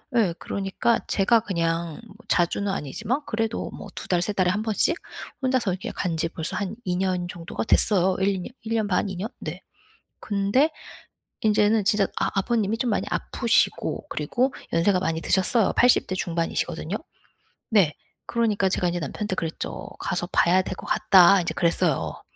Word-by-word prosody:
예. 210 -8 +3
그러니까 200 +4 0
제가 220 +3 +3
그냥 165 -3 -2
뭐 200 - -16
자주는 195 +2 +1
아니지만 215 - -2
그래도 225 0 -2
뭐 - - -9
2 - - -7
달, 180 -2 +2
3 195 - -1
달에 185 -3 +2
1 205 +4 0
번씩 220 +9 +2 0.5
혼자서 255 -6 +1
이렇게 180 +1 -4
간 175 -3 -2
지 165 +1 0
벌써 160 -1 -4
한 200 +1 -3
2 180 -1 0
년 185 -1 0
정도가 170 -2 -5
됐어요. 190 -4 +4
1-2 195 0 +1
년 180 - -6 0.2
1 225 - -2
년 220 -2 +1
반, 195 +1 0
2 190 - -5
년? 190 +5 -3
네. - - -6 0.6
근데 205 +9 +1 0.7
인제는 210 0 +3
진짜 200 0 +3
아 - - 0
아버님이 220 +1 0
좀 240 0 0
많이 - - 0
아프시고 235 +3 0
그리고 250 - -1 0.2
연세가 185 +3 +3
많이 165 -3 -1
드셨어요. 195 +5 +2
80 245 0 +4
대 185 - -3
중반이시거든요. 170 -2 -2 0.7
네. 190 -9 +4 0.3
그러니까 215 -5 +1
제가 180 -1 0
이제 175 0 -1
남편한테 185 +6 -3
그랬죠. 165 -2 -4
"가서 175 0 -2
봐야 180 +2 +4
될 185 - -5
것 - - -10
같다." 190 +1 +6
인제 175 - -3
그랬어요. 165 - 0
195 Hz, 315 characters per minute, -25 LUFS, 175-220 Hz, 0.7 s, 같다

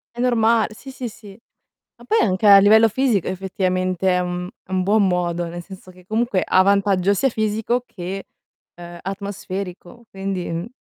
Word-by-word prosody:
È - - -10
norma 230 -3 +3
sì, 265 +5 -11
sì, 255 -2 -6
sì. 205 0 -14 0.6
Ma - - -16
poi, 445 +1 +2
anche 190 +1 0
a 200 -1 +10
livello 220 +3 +6
fisico 235 -5 0
effettivamente 185 -1 -1
è 180 0 +2
un 180 0 -3
è 190 - -16
un 185 -1 0
buon 205 0 +3
modo, 175 -1 -1
nel 175 +1 -7
senso 185 -1 -12
che 180 0 -19
comunque 220 -2 0
ha 185 - +4
vantaggio 200 -1 +2
sia 270 +7 +1
fisico 220 +2 -1
che, 190 +1 -7 0.5
ehm, 175 0 -11
atmosferico, 195 +2 -6
quindi, 195 -2 -4
mh 165 +5 -4
195 Hz, 170 wpm, -21 LUFS, 180-220 Hz, 0.6 s, a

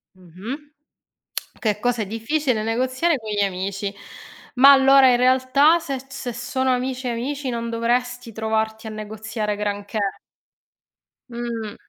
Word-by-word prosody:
Mh-mh. 205 - -9 0.9
Che 210 -2 -1
cosa 245 -1 0
è - - -4
difficile 230 +2 -1
negoziare 255 +8 +1
con 220 -3 -7
gli 205 -1 0
amici. 195 +1 -2 0.6
Ma 270 +3 +8
allora 270 0 +7
in 245 - +4
realtà 260 +6 +4
se 275 -5 -4
se 255 -2 -5
sono 260 +2 -1
amici 255 0 -2
amici, 265 +4 -3
non 235 -1 -3
dovresti 245 +1 -1
trovarti 220 0 -2
a - - -5
negoziare 215 0 -4
granché. 205 +1 -3 1.3
Mh. 235 -3 -5
235 Hz, 125 wpm, -22 LUFS, 215-260 Hz, 1.3 s, Ma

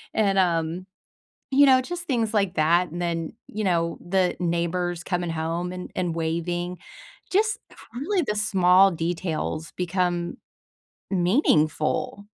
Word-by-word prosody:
and, 200 -3 +2
um, 170 0 0 0.7
you 285 +1 +7
know, 260 -1 +6
just 350 +5 -5
things 235 -8 -1
like 200 -4 +1
that 170 +4 +3
and 175 - -5
then, 165 -2 -2
you 215 +1 -4
know, 170 -2 +1
the 185 0 +1
neighbors 175 0 -1
coming 175 -2 -2
home 165 +2 -2
and 180 - -7
and 175 -3 -1
waving. 175 +2 -2 0.5
Just 430 +4 +2 0.3
really 345 +9 0
the 210 - 0
small 195 -2 +5
details 165 -1 -3
become 175 -1 -1 0.7
meaningful. 175 - +1
180 Hz, 125 wpm, -25 LUFS, 170-200 Hz, 0.7 s, you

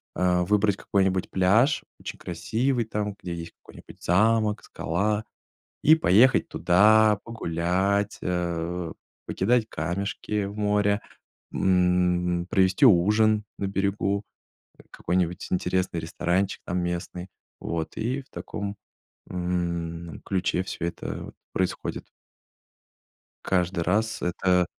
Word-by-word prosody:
э, 90 -1 +2
выбрать 105 +2 +2
какой-нибудь 95 -1 0
пляж, 110 +10 +3 0.2
очень - - -8
красивый, 125 +2 -1
там, 105 -2 -3
где 90 - -5
есть 85 -1 -7
какой-нибудь - - -14
замок, 105 +3 +2
скала, 105 +6 -1 0.6
и 155 +2 +7
поехать 120 - +4
туда, 105 +3 +4
погулять, 100 -1 -1
э, 85 -1 -2 0.3
покидать 115 +3 +1
камешки 100 +5 -3
в 100 +1 -6
море, 105 0 +1 0.5
м, 90 -1 +2
провести 95 +3 +3
ужин 105 +2 +4
на 100 - -1
берегу, 100 +1 0 0.7
какой-нибудь 90 0 -1
интересный 90 -1 0
ресторанчик 90 +4 -1
там 90 - -1
местный. 90 +1 -4 0.3
Вот, 80 -1 -4
и 125 +5 -1
в 135 - -28
таком, 100 -1 -5 0.5
м, 85 -2 -3
ключе 95 -1 0
всё 85 - -5
это 85 0 -5
вот - - -10 0.2
происходит. 95 -1 -3 1.4
Каждый 90 -1 +1
раз. 110 +5 0
Это 90 0 +2
95 Hz, 105 wpm, -26 LUFS, 90-105 Hz, 1.4 s, и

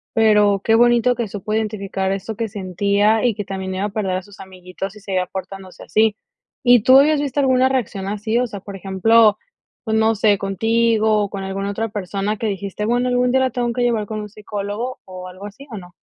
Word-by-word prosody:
pero 210 -3 +4
qué 225 - +2
bonito 240 +1 +4
que 240 -2 -3
supo 205 +1 -5
identificar 200 -3 -2
eso 200 +3 -4
que 225 +1 -2
sentía 200 +3 +1
y 235 -4 +2
que 205 - -5
también 190 -1 -5
iba 190 - -2
a 210 - -1
perder 195 -3 -2
a 185 - -6
sus 205 0 -17
amiguitos 185 +1 -8
si 210 - -13
seguía 185 -2 -2
portándose 190 0 -8
así, 215 +4 +2 0.5
¿y 245 -3 +6
tú 260 +4 +7
habías 295 +1 +4
visto 285 0 -1
alguna 260 -1 +3
reacción 205 -7 -2
así?, 215 +3 -1
o 250 - 0
sea, 205 -2 -8
por 200 +1 -10
ejemplo, 210 +3 +3 0.5
pues 220 -2 -1
no 220 0 +3
sé, 205 -1 +2
contigo 220 +2 +1
o - - -8
con 195 -1 -6
alguna 195 +1 -3
otra 225 +3 -3
persona 200 +1 -3
que 225 - -2
dijiste: 200 +1 -4
"Bueno, 245 +2 +1
algún 250 0 +2
día 265 - +3
la 260 -1 +1
tengo 240 0 -1
que 245 +1 -1
llevar 225 -4 0
con 215 -1 -4
un 210 - -7
psicólogo" 210 +4 -5
o 185 -1 -9
algo 185 +2 -10
así, 235 +8 -11
¿o 220 - -6
no? 180 -2 -12
210 Hz, 220 wpm, -20 LUFS, 195-230 Hz, 0.5 s, tú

